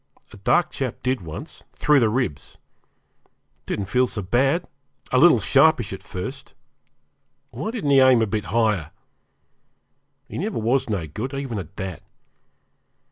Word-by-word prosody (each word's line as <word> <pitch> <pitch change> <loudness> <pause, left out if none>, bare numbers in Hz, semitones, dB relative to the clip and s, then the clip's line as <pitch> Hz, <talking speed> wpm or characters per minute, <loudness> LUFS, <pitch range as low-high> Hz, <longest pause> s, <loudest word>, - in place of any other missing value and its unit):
A - - -11
dark - - +2
chap - - -4
did 130 -2 0
once 80 -3 -9
through 150 -1 +4
the 115 -3 +3
ribs 115 - -3 0.7
it - - -36 0.4
didn't 100 - -2
feel 125 +6 +2
so 105 -4 -5
bad, 135 - +1 0.5
a 130 - +4
little 165 -4 +7
sharpish 125 0 +3
at 95 - -7
first; 90 -1 -7 1.0
why 140 - -4
didn't 220 - -2
he 135 - +6
aim 130 -3 +6
a - - +2
bit 105 -1 -3
higher? 105 -7 +1 1.4
He - - -6
never 210 +5 -2
was 120 +3 +1
no 95 -6 -1
good, 115 - -5
even 135 -6 -4
at 95 +1 -9
that. 95 -3 -6
120 Hz, 150 wpm, -23 LUFS, 100-135 Hz, 1.4 s, little